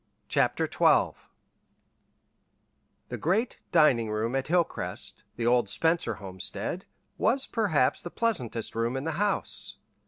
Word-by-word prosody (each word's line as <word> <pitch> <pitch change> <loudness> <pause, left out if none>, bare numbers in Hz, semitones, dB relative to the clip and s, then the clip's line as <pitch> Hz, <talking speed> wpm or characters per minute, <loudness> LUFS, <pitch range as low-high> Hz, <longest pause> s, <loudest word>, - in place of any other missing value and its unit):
CHAPTER - - +1
XII - - +3 2.0
The - - -5
great 205 +9 0
dining 135 - +4
room 110 +4 -1
at 135 0 -1
Hilcrest, 175 +1 -1
the 115 - -3
old 120 -3 +3
Spencer 165 - +1
homestead, 95 -2 -5 0.3
was 270 +2 +2
perhaps 180 - +1
the 175 - -6
pleasantest 125 - -2
room 115 +3 -1
in 135 - -3
the 160 - -1
house. 205 -1 +1
135 Hz, 120 wpm, -28 LUFS, 115-175 Hz, 2.0 s, dining